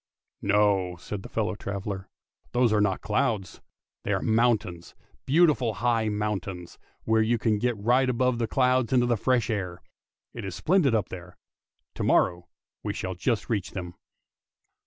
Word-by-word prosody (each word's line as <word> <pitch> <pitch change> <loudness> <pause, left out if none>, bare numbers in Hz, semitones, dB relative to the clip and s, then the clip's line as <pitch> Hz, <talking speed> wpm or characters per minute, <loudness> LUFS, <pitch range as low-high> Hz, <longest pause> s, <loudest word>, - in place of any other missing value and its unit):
" - - -57 0.2
No," 95 -4 +2
said 95 +3 -6
his - - -10
fellow 110 -1 -1
traveller, 100 -1 -5 0.2
" - - -38
those 120 -3 +3
are 105 - +3
not 95 -3 +1
clouds, 105 -4 -1 0.4
they - - -3
are - - 0
mountains, 110 -7 +1 0.3
beautiful 140 -7 +3
high 115 0 +1
mountains, 100 -4 -4 0.2
where 110 0 +3
you 115 +2 +2
can 110 -2 +1
get 120 0 0
right 125 +5 +2
above 125 0 +1
the 115 - 0
clouds 125 0 +2
into 125 -2 +4
the 120 -1 +2
fresh 120 +1 +1
air. 90 -5 -3 0.5
It 115 - -7
is 95 -2 -5
splendid 155 - +2
up 105 -4 0
there! 90 -1 -9 0.6
To - - -4
morrow 85 -1 +2 0.3
we - - -3
shall 95 - -4
just 105 +5 -1
reach 105 -5 -2
them." 90 -3 -5
110 Hz, 165 wpm, -27 LUFS, 95-120 Hz, 0.6 s, into